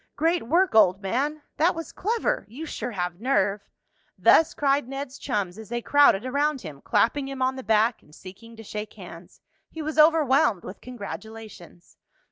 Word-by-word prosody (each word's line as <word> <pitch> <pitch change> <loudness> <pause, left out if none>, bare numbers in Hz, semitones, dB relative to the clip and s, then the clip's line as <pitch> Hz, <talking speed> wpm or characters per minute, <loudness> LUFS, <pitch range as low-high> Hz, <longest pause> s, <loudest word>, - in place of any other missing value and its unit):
"Great 330 -3 0
work, 355 +7 +2
old 195 -4 +5
man!" 275 +10 -2
"That 335 +4 +2
was 330 -1 -6
clever!" 440 - -1
"You 280 +9 -7
sure 245 -6 -5
have 180 -3 -4
nerve!" 205 -6 +1 0.6
Thus 325 - +4
cried 280 -2 +1
Ned's 275 0 -6
chums 205 -7 -3
as 220 - -11
they 240 0 -3
crowded 285 -7 +4
around 285 +1 0
him, 150 -6 -10
clapping 235 +7 +1
him 270 -1 -3
on 260 +1 0
the 260 - -6
back 220 0 +1
and 150 - -20
seeking 230 +5 -13
to 225 - -11
shake 210 0 -6
hands. - - -13 0.3
He 320 - -7
was 310 +1 -3
overwhelmed 300 - +4
with 190 - -10
congratulations. 220 -6 -10
245 Hz, 170 wpm, -25 LUFS, 210-290 Hz, 0.6 s, old